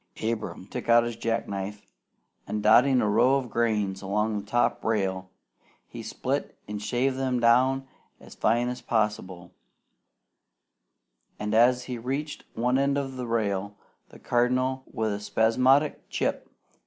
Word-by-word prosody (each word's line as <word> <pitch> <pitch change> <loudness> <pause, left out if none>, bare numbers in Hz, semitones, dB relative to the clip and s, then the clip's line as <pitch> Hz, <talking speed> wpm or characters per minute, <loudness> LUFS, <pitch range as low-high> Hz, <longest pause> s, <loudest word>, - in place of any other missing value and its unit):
Abram 110 -4 -3
took 120 +4 -7
out 115 0 +6
his 120 -1 -4
jack 115 0 -2
knife, 100 +1 -5 0.6
and 105 -1 -3
dotting 125 +4 +5
a - - +1
row 125 +6 +4
of 130 -4 -2
grains 105 -5 0
along 105 +2 -1
the - - -8
top 120 +4 0
rail, 95 -4 -1 0.6
he - - -9
split - - -3
and 105 0 -5
shaved 130 +4 0
them 130 -2 0
down 130 +3 +3 0.3
as - - -14
fine 120 +1 +1
as 125 0 -4
possible; 95 -6 -2 1.9
and 105 0 -3
as 125 +2 +4
he 125 -2 -5
reached 140 +5 -4
one 125 +3 +1
end 140 0 +1
of 135 -2 -3
the 125 -1 -5
rail, 100 -3 -1 0.3
the - - -14
Cardinal, 130 +2 0
with 110 -2 -1
a 100 - -4
spasmodic 130 +7 +2
"Chip!" - - -2
115 Hz, 145 wpm, -26 LUFS, 105-130 Hz, 1.9 s, out